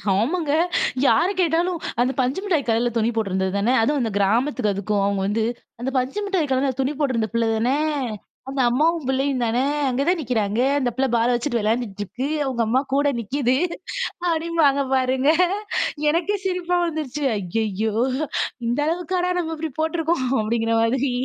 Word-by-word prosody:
ஆமாங்க! 290 - 0 0.5
யார 340 - +4
கேட்டாலும் 340 +1 +1 0.2
அந்த 255 +2 +2
பஞ்சு 260 +7 +1
மிட்டாய் 335 -9 0
கலர்ல 235 +2 +2
துணி 225 +1 +2
போட்டிருந்தது 190 -3 0
தானே. 230 +6 +2
அதுவும் 290 +4 +1
அந்த 225 -2 -1
கிராமத்துக்கு 225 +3 +1
அதுக்கும் 200 +1 -1
அவங்க 200 -1 0
வந்து, 220 +2 0 0.4
"அந்த 255 +2 -2
பஞ்சு 260 +10 -1
மிட்டாய் 360 -8 0
கலர்ல 265 +1 +2
துணி 265 +2 +1
போட்டிருந்த 235 -7 0
பிள்ள 230 0 +1
தானே. 250 +6 +1 0.7
அந்த 270 -1 -1
அம்மாவும் 310 +4 +1
பிள்ளையும் 265 -1 0
தானே. 240 +3 +1 0.2
அங்கே 260 +2 0
தான் 355 -1 +2
நிக்கிறாங்க. 220 -4 -1 0.2
அந்த 250 -2 +1
பிள்ள 265 0 +1
பால 230 +1 +2
வச்சுட்டு 240 -1 0
விளையாண்டிட்டுருக்கு. 215 +2 -2 0.2
அவங்க 250 -3 -1
அம்மா 255 +4 +2
கூட 285 +1 +3
நிக்கிது." 255 +3 0 0.7
அப்படிம்பாங்க 320 -4 +2
பாருங்க. 260 +2 +2 0.8
எனக்கே 350 +6 +1
சிரிப்பா 360 -1 0
வந்துருச்சு. 300 -3 -3
ஐயய்யோ! 210 +2 -2 0.7
இந்த 240 +5 0
அளவுக்காடா 360 +2 -1
நம்ம 325 -1 -2
இப்படி 315 -2 -4
போட்ருக்கோம்! 320 -3 0 0.2
அப்படிங்கிற 225 +1 0
மாதிரி. 255 +3 +1
260 Hz, 150 wpm, -22 LUFS, 225-315 Hz, 0.8 s, யார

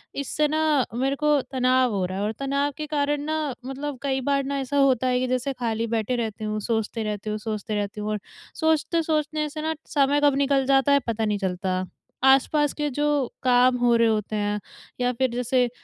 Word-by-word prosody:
इससे 295 +2 0
ना 305 -3 +2
मेरे 270 +3 0
को 300 +1 -1 0.2
तनाव 255 -1 +2
हो 195 -3 -1
रहा 185 +1 -4
है 200 - -1
और 210 - 0
तनाव 280 +1 0
के 305 - -4
कारण 290 -1 0
ना 310 +1 -1 0.3
मतलब 275 +1 -5
कई 270 -2 0
बार 275 +1 +1
ना 280 0 -2
ऐसा 275 +2 -2
होता 260 -2 +3
है 250 0 +2
कि 255 - 0
जैसे 255 +2 -1
ख़ाली 230 -2 -2
बैठे 230 +2 -1
रहती 220 -3 -3
हूँ 215 0 -2
सोचते 225 0 -2
रहती 210 0 -4
हूँ 210 - -2
सोचते 215 0 -4
रहती 205 0 -3
हूँ 210 - -3
और 210 - -1 0.4
सोचते 320 +1 +2
सोचने 305 -1 -1
से 305 +1 -6
ना 320 +1 -1
समय 285 0 +2
कब 285 -2 +4
निकल 275 -1 +2
जाता 270 +1 +3
है 280 - +6
पता 225 -1 0
नहीं 210 -1 0
चलता। 185 -1 -2 0.4
आस-पास 275 +2 +4
के 295 -1 -2
जो 295 +3 0 0.4
काम 250 0 +4
हो 240 -1 +3
रहे 230 0 +4
होते 215 -1 -1
हैं 205 0 -1 0.4
या 245 0 +2
फ़िर 260 +2 +1
जैसे 250 0 +1
255 Hz, 210 wpm, -24 LUFS, 220-285 Hz, 0.4 s, है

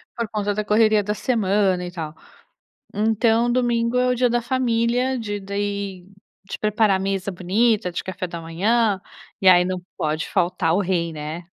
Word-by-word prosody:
Por 235 -2 -2
conta 205 -1 -1
da 210 +1 -2
correria 215 0 +3
da 210 +1 -1
semana 200 -5 +1
e 175 - -6
tal. 160 -3 -6 0.8
Então 225 +3 +2
domingo 240 -1 +1
é 250 - +2
o 250 - +2
dia 250 0 +2
da 240 0 +1
família 245 +1 0
de 205 -3 -4
daí, 200 -2 -4 0.4
de - - -5
preparar 210 -2 +2
mesa 195 0 -2
bonita 195 +3 +1
de - - -3
café 185 -1 -4
da 170 -1 -7
manhã 200 +5 +1 0.4
e 190 - +5
aí 180 -1 +7
não 185 0 -3 0.2
pode 155 +1 -2
faltar 175 -3 +1
o 200 - +2
rei, 175 -3 -1
né? 155 +3 -6
205 Hz, 170 wpm, -22 LUFS, 180-230 Hz, 0.8 s, aí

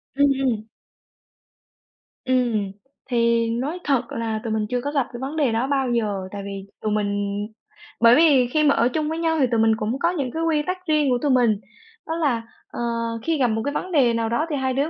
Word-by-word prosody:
Ừm, 280 0 +4
ừm. 225 -5 -1 1.6
Ừm, 240 -6 +1 0.4
thì 235 -1 +2
nói 275 +10 -2
thật 265 -4 0
là 225 -1 -2
tụi 225 - -2
mình 215 -1 0
chưa 250 -1 -1
có 285 - -3
gặp 275 -4 0
cái 240 - -6
vấn 270 +4 -5
đề 285 -6 +2
đó 230 +4 0
bao 270 -2 0
giờ, 215 -4 0 0.2
tại 200 -1 -6
vì 195 -1 -6 0.2
tụi 215 - -1
mình 205 -1 -1 0.6
bởi 230 +1 +7
vì 285 -6 +5
khi 305 +5 +1
mà 285 -1 +4
ở 235 - +3
chung 305 +3 -1
với 320 - -3
nhau 325 -1 +1
thì 270 - +4
tụi 230 - +2
mình 225 0 +4
cũng 225 +5 -2
có 335 - +2
những 275 -8 -3
cái 325 +1 -3
quy 315 -2 +2
tắc 365 - -1
riêng 300 -2 +2
của 245 - +2
tụi 290 - +1
mình, 240 -4 +4 0.5
đó 320 - -2
là, 280 -9 +1 0.3
ờ, - - -7 0.4
khi 325 -2 0
gặp 255 -3 +3
một 220 0 -1
cái 285 - -1
vấn 365 +4 -4
đề 260 -7 +4
nào 230 -1 -1
đó 235 +7 0
thì 295 - -1
hai 260 -1 -1
đứa 280 +4 0
250 Hz, 230 wpm, -23 LUFS, 225-290 Hz, 1.6 s, bởi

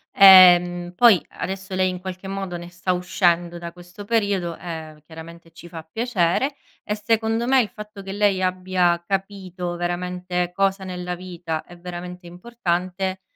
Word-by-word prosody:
Ehm, 180 -2 +7
poi 230 -3 +6 0.2
adesso 190 0 -5
lei 185 0 +2
in 180 -1 -5
qualche 185 +1 -7
modo 195 -2 -4
ne 175 0 -8
sta 180 +1 -2
uscendo 175 -1 0
da 170 0 -7
questo 180 +3 -12
periodo, 200 -6 0
e 160 -3 -8
chiaramente 165 +1 -12
ci 170 +1 -13
fa 165 -1 -8
piacere. 225 - 0 0.3
E 210 - -2
secondo 225 +2 0
me 265 0 +5
il 215 - -3
fatto 210 -1 -10
che 195 - -7
lei 200 -2 +1
abbia 185 -2 +1
capito 190 -3 -4
veramente 180 0 -3
cosa 195 0 0
nella 180 -1 -5
vita 175 -3 -5
è 175 - -14
veramente 180 0 -8
importante, 185 -1 -3
180 Hz, 155 wpm, -22 LUFS, 175-195 Hz, 0.3 s, Ehm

